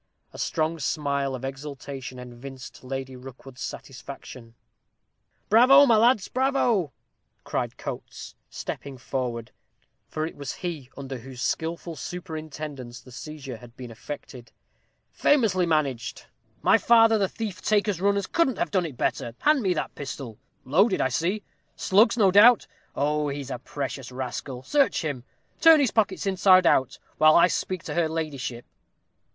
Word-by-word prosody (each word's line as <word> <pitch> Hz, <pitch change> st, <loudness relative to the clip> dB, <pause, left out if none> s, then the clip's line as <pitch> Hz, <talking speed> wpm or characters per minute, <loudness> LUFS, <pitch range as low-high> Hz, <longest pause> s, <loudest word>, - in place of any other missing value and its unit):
A -, -, -10 dB
strong 160 Hz, +1 st, -1 dB
smile 140 Hz, -1 st, -1 dB
of 130 Hz, +1 st, -6 dB
exultation 135 Hz, -1 st, -7 dB
evinced 125 Hz, +2 st, -10 dB
Lady 130 Hz, 0 st, -5 dB
Rookwood's 130 Hz, 0 st, -12 dB
satisfaction. 125 Hz, -3 st, -9 dB, 0.9 s
"Bravo, 255 Hz, +6 st, +7 dB
my 235 Hz, -4 st, +5 dB
lads, 225 Hz, -2 st, +4 dB
bravo!" 250 Hz, -, +1 dB, 0.5 s
cried -, -, -3 dB
Coates, -, -, -7 dB, 0.2 s
stepping 140 Hz, -2 st, -6 dB
forward, 125 Hz, -3 st, -4 dB, 0.6 s
for 155 Hz, 0 st, -3 dB
he 160 Hz, -, -5 dB
it -, -, -20 dB
was 140 Hz, -2 st, -6 dB, 0.4 s
under 135 Hz, -2 st, -6 dB
whose 125 Hz, 0 st, -8 dB
skilful 165 Hz, +5 st, -2 dB
superintendence 150 Hz, -5 st, -7 dB
the 130 Hz, -, -16 dB
seizure 140 Hz, -2 st, -8 dB
had 120 Hz, +1 st, -15 dB
been 125 Hz, -2 st, -8 dB
effected: 125 Hz, 0 st, -9 dB, 0.6 s
"famously 210 Hz, -11 st, +2 dB
managed; 140 Hz, -7 st, -1 dB, 0.4 s
my -, -, +5 dB
father 225 Hz, -2 st, +5 dB
the 195 Hz, -2 st, +1 dB
thief 205 Hz, -7 st, -5 dB
taker's 205 Hz, -3 st, +1 dB
runners 200 Hz, 0 st, +2 dB
couldn't 270 Hz, -, +1 dB
have -, -, -1 dB
done 185 Hz, -4 st, +1 dB
it 135 Hz, -6 st, -11 dB
better 115 Hz, 0 st, -2 dB
hand 300 Hz, -2 st, +4 dB
me 190 Hz, -4 st, +1 dB
that 150 Hz, -, -3 dB
pistol 130 Hz, -5 st, -7 dB, 0.3 s
loaded, 185 Hz, -, +3 dB
I 130 Hz, -, +2 dB
see 180 Hz, +10 st, -1 dB, 0.3 s
slugs, 215 Hz, +5 st, +3 dB
no 200 Hz, -4 st, +5 dB
doubt 215 Hz, +4 st, +7 dB, 0.3 s
oh, 150 Hz, +1 st, 0 dB
he's 140 Hz, -1 st, -5 dB
a -, -, -4 dB
precious 135 Hz, -2 st, -5 dB
rascal 130 Hz, 0 st, -5 dB
search 280 Hz, -, +2 dB
him 130 Hz, -5 st, -4 dB, 0.3 s
turn 325 Hz, -1 st, +8 dB
his 275 Hz, -6 st, +2 dB
pockets 205 Hz, -4 st, 0 dB
inside 185 Hz, -1 st, +5 dB
out, 130 Hz, -5 st, +3 dB, 0.2 s
while 155 Hz, 0 st, +7 dB
I 170 Hz, -, +7 dB
speak 185 Hz, 0 st, -2 dB
to -, -, -5 dB
her 170 Hz, -2 st, +1 dB
ladyship." 145 Hz, -7 st, -4 dB
150 Hz, 145 wpm, -26 LUFS, 130-195 Hz, 0.9 s, turn